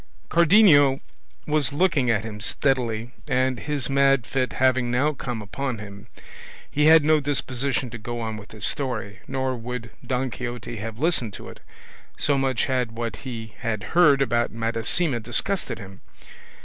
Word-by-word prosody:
Cardenio 160 -6 +6 0.5
was 150 -2 +1
looking 145 -5 +2
at 110 -2 +2
him 110 -2 -7
steadily, 120 0 -1 0.2
and 130 -2 +1
his 145 -3 -2
mad 135 -3 +3
fit 130 0 -1
having 130 -1 +2
now 135 +5 +1
come 125 -5 -5
upon 130 +4 -4
him, 100 +1 -10 0.6
he 150 +1 +2
had 160 0 +7
no 155 +1 +4
disposition 135 -2 -1
to 120 - -7
go 120 +2 -5
on 110 -1 -3
with 105 -1 -10
his 105 -3 -5
story, 110 -8 -3
nor 130 -1 -1
would 120 -1 -6
Don 130 0 -1
Quixote 120 +1 -6
have 110 +1 -6
listened 130 - 0
to - - -9
it, - - -12 0.6
so 145 - +1
much 135 -3 +1
had 125 -4 -1
what 115 -3 -4
he 115 -5 -7
had 115 -5 -3
heard 145 -5 +5
about 120 -2 +1
Madasima 115 +6 0
disgusted 120 - 0
him. 95 -2 -11
125 Hz, 160 wpm, -24 LUFS, 115-140 Hz, 0.6 s, had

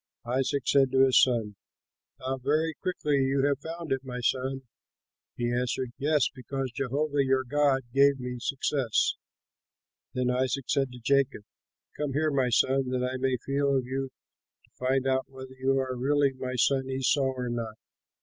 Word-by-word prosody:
Isaac 130 +2 0
said 135 -1 +4
to 135 0 +6
his 130 - +5
son, 115 -5 +1 0.6
"How 130 +1 -3
very 155 +5 +1
quickly 150 -4 -1
you 135 +1 +1
have 145 -1 +1
found 165 0 -7
it, 135 0 0
my 125 -2 -6
son." 130 +2 -1 0.7
He 120 0 -1
answered, 125 0 -1
"Yes, 150 -1 +2
because 135 0 -4
Jehovah 140 +3 0
your 130 0 +2
God 140 +1 +2
gave 140 0 +4
me 125 0 -5
success." 135 -2 0 1.0
Then 125 0 +1
Isaac 130 +1 0
said 135 -2 +1
to 125 - -10
Jacob, 135 -2 +1 0.5
"Come 145 -2 -3
here, 155 +2 +1
my 135 -3 +1
son, 130 +2 +2
that 125 0 -1
I 130 +1 -2
may 130 0 0
feel 140 0 +1
of 130 - -1
you 135 +1 -3 0.5
to - - -28
find 130 +1 0
out 130 0 0
whether 130 -1 -10
you 130 +1 0
are 130 -1 -1
really 140 +2 +2
my 130 -1 -5
son 135 +1 +2
Esau 135 +2 +1
or 125 -1 -3
not." 115 -2 -4
130 Hz, 170 wpm, -28 LUFS, 125-140 Hz, 1.0 s, to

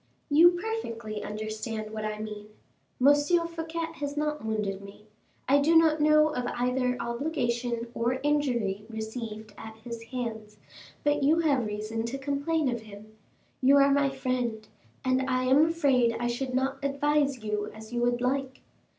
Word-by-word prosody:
"You 335 +4 +7
perfectly 230 - -4
understand 215 +1 -5
what 215 0 -4
I 215 0 -3
mean. 210 -1 -7 0.5
M. 275 +3 +7 0.3
Fouquet 330 0 -4
has 285 0 -4
not 300 0 -1
wounded 210 -3 -2
me; 200 +1 -13 0.4
I 280 +2 +5
do 315 +4 +3
not 320 -2 +5
know 305 0 +5
of 250 -5 -3
either 250 +1 0
obligation 235 -2 -2
or 235 +1 0
injury 240 -9 0
received 220 -1 -6
at 220 0 -9
his 235 -1 -6
hands, 225 -4 -5 0.5
but 290 0 +2
you 310 +4 +4
have 275 -8 +2
reason 215 +2 -3
to 240 +4 -3
complain 285 +3 -1
of 240 -2 -1
him. 215 0 -13 0.5
You 270 +2 +6
are 280 0 +5
my 280 0 +3
friend, 250 -5 -2 0.4
and 260 0 +2
I 255 0 +1
am 270 +5 +5
afraid 270 -8 +2
I 240 - -2
should 250 +2 -2
not 265 +2 -1
advise 280 -2 +1
you 210 -1 -2
as 220 +2 -11
you 240 - 0
would 240 0 +1
like." 265 +1 -1
250 Hz, 160 wpm, -28 LUFS, 220-285 Hz, 0.5 s, You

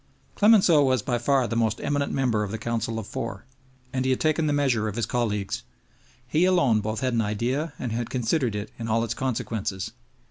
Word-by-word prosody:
Clemenceau 195 -8 +5
was 130 -5 +2
by 120 0 0
far 135 +1 +2
the 115 - -3
most 115 -2 +1
eminent 145 0 -1
member 125 -6 +1
of 105 - -3
the 110 - -3
Council 115 0 -2
of 110 - -4
Four, 100 +1 -5 0.5
and 130 -1 0
he 130 - 0
had 130 - +1
taken 155 0 +1
the - - +1
measure 130 -7 +1
of 105 - -4
his 115 - 0
colleagues. 105 -5 -1 0.7
He 155 +7 +2
alone 155 -13 +3
both 110 +1 -3
had 130 -2 0
an 115 - +2
idea 120 +9 -1
and 125 - -4
had 115 +1 -2
considered 125 -1 0
it 105 +1 -5
in 115 - -4
all 115 +1 +1
its 115 - -2
consequences. 110 -6 -3
120 Hz, 210 wpm, -25 LUFS, 110-135 Hz, 0.7 s, Clemenceau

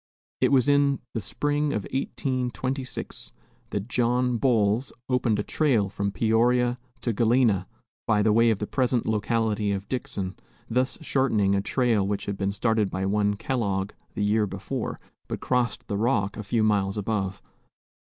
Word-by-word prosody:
It - - +3
was 130 -3 +4
in 140 -1 +4 0.2
the 115 - -2
spring 145 +7 -1
of 105 - -1
1826 130 0 -3 0.4
that 100 +1 -3
John 125 0 +1
Boles 115 -1 +2 0.2
opened 125 -4 +1
a 105 - -1
trail 120 -10 +1
from 100 0 -2
Peoria 120 +3 +2 0.2
to 120 - 0
Galena, 110 -4 +3 0.4
by 105 -2 +3
the 110 0 +4
way 115 +1 +5
of 110 - +2
the 105 - -3
present 125 0 0
locality 110 -1 0
of 100 0 -3
Dixon, 100 -7 -4 0.3
thus 130 +2 0
shortening 125 -10 +2
a 100 - +2
trail 110 -2 +1
which 100 0 -2
had 100 - -2
been 100 0 -1
started 110 0 +1
by 95 +1 -2
one 105 +1 +1
Kellogg 100 -4 -1 0.2
the 105 - -1
year 105 +1 +2
before, - - -4 0.3
but - - -4
crossed 125 -2 0
the 100 - -2
Rock 105 -3 +1
a - - -5
few 110 +2 0
miles 100 -2 +1
above. 100 -2 -2
110 Hz, 160 wpm, -26 LUFS, 100-125 Hz, 0.4 s, way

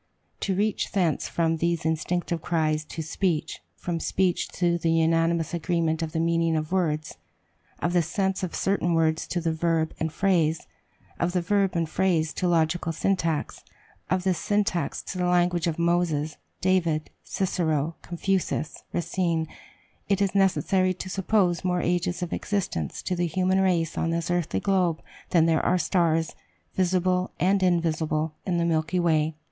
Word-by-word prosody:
To 195 - -1
reach 210 +2 0
thence 180 -6 +1
from 165 -1 +1
these 170 0 -1
instinctive 170 +1 -1
cries 155 -2 0
to 160 - -6
speech; 160 0 -1
from 170 -2 -3
speech 180 +1 0
to 170 -1 +1
the 165 - 0
unanimous 165 0 +2
agreement 165 -1 0
of 160 -1 -3
the 160 - -2
meaning 165 0 +2
of 155 +1 -3
words 155 -5 -1 0.6
of 170 - -1
the 175 - +4
sense 190 +3 -1
of 185 -3 -3
certain 175 -3 +1
words 160 0 +1
to 175 - -1
the 165 -1 0
verb 160 -1 0
and 160 0 -1
phrase 165 -2 +1 0.5
of 175 +1 0
the 180 - +1
verb 195 0 +1
and 165 -1 +1
phrase 165 -2 +1
to 180 - -1
logical 165 0 +1
syntax 165 -2 -1 0.5
of 185 -1 +1
this 185 -2 +1
syntax 205 -6 0
to 185 - -6
the 180 - +1
language 175 -1 +2
of 165 - -1
Moses, 170 -3 +1 0.3
David, 170 -5 +1
Cicero, 165 -4 -1
Confucius, 175 -3 -2
Racine, 170 -1 0 0.6
it 200 - +2
is 200 -2 +1
necessary 185 -1 +2
to 185 +1 -6
suppose 190 -2 +1
more 180 -1 +1
ages 180 +1 0
of 175 - -4
existence 175 - -2
to 180 - -1
the 175 0 0
human 185 +3 +1
race 170 -4 +1
on 165 - 0
this 170 +1 -1
earthly 170 - 0
globe 180 -4 +1 0.3
than 165 -2 +4
there 160 -2 +2
are 180 - +3
stars, 165 -3 +1 0.4
visible 185 0 +1
and 190 +2 +3
invisible, 160 -3 +1
in 180 -2 +1
the 170 - +1
Milky 165 +2 +1
Way. 160 -2 +2
170 Hz, 160 wpm, -26 LUFS, 160-185 Hz, 0.6 s, the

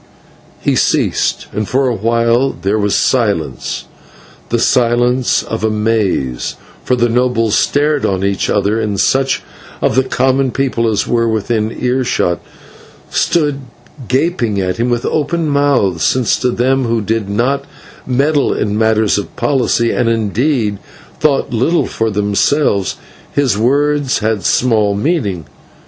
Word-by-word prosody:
He - - +1
ceased, - - 0
and 105 +1 -2
for 135 +1 +1
a 125 - +1
while 115 +4 +1
there 100 +3 0
was 100 -1 +1
silence, 105 - -1 0.6
the - - +1
silence 120 +1 +2
of 110 - -5
amaze, 105 - -1 0.3
for 125 - +1
the 120 -1 +2
nobles 120 -2 +1
stared 145 0 +1
each - - +2
on 95 -1 -2
each, 100 -1 0 0.3
and 105 -3 -2
such 135 +5 +1 0.4
of - - +1
the 130 - +3
common 130 +1 +1
people 125 -3 0
as 105 - 0
were 115 -1 +1
within 110 0 -1
earshot 125 -8 0 0.7
stood 150 -4 +1 0.5
gaping 130 - 0
at 90 -1 -1
him 120 +2 0
with 120 -1 -1
open 160 +2 -1
mouths, 140 - +1
since 125 -3 +2
to 125 - +1
them 130 +2 +1
who 115 0 0
did 110 0 -2
not 135 +7 0 0.4
meddle 140 +3 +1
in 105 0 -1
matters 110 -2 +2
of 100 - -8
polity, 120 -4 +1
and, 120 -2 +1
indeed, 115 0 0 0.4
thought 140 -4 +1
little 145 +9 +1
for 115 0 -2
themselves, 105 +1 +1 0.4
his 140 -7 +1
words 140 +4 +1
had 110 -2 -1
small 110 -5 +2
meaning. 105 - -1
120 Hz, 135 wpm, -15 LUFS, 105-135 Hz, 0.7 s, the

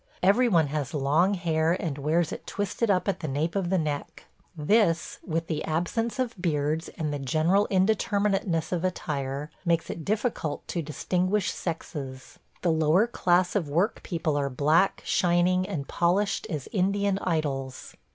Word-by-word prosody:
Every 215 +7 +5
one 165 -6 +4
has 150 +1 -3
long 155 +8 +2
hair 165 -2 +1
and 150 -4 -3
wears 160 +3 +1
it - - -7
twisted 205 +3 -2
up 185 -1 +2
at 200 - 0
the 155 - -4
nape 150 +4 -1
of 190 -3 0
the 190 - +2
neck; 150 -3 -3 0.3
this, 170 +1 +2
with 165 -1 -2
the 155 -2 -3
absence 210 +9 -1
of 255 -3 -1
beards 155 -1 0
and 155 -4 -2
the 145 - -3
general 160 +9 +2
indeterminateness 195 -3 +1
of 175 -1 -1
attire, 145 -5 -3
makes 170 -2 +1
it 165 - -6
difficult 210 - -2
to 170 - -1
distinguish 180 +6 0
sexes. 140 -6 -6 0.2
The 175 - +3
lower 160 +6 +3
class 180 -6 +1
of 170 -8 0
work 175 +10 +1
people 160 -4 -2
are 140 -1 0
black, 155 +8 +2
shining, 180 +1 +2
and 140 -3 -4
polished 195 +5 +1
as 150 -7 -4
Indian 200 +1 +1
idols. 140 -7 -3
170 Hz, 160 wpm, -27 LUFS, 150-195 Hz, 0.3 s, Every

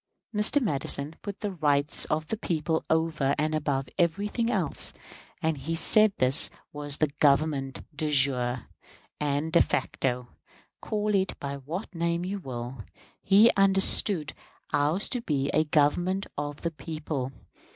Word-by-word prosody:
Mr. 210 +7 +4
Madison 145 - -1
put 205 -1 -7
the 205 -2 -2
rights 150 -4 +3
of 155 +1 -1
the 220 - -2
people 160 -4 -1
over 160 -4 +1
and 155 +1 0
above 140 -3 -1
everything 205 +7 0
else, 245 - -1 0.5
and 160 -2 0
he 160 +5 -3
said 215 +5 +4
this 130 +2 +5 0.2
was 145 -1 -3
the 155 - +1
Government 140 -2 +2
de 155 +1 -2
jure 130 -4 +1 0.5
and 150 +2 -1
de 170 - +6
facto. 125 -2 -1 0.5
Call 210 0 -1
it 190 -1 0
by 140 0 -5
what 165 +10 -6
name 170 +1 -1
you 200 +2 -3
will, 125 - -7 0.4
he 210 +4 +6
understood 195 -3 +3 0.4
ours 150 +7 +1
to 245 - -3
be 140 -8 -1
a 155 - +2
Government 175 +6 +1
of 145 0 -5
the 170 - -1
people. 155 -5 -5
155 Hz, 140 wpm, -27 LUFS, 140-185 Hz, 0.5 s, de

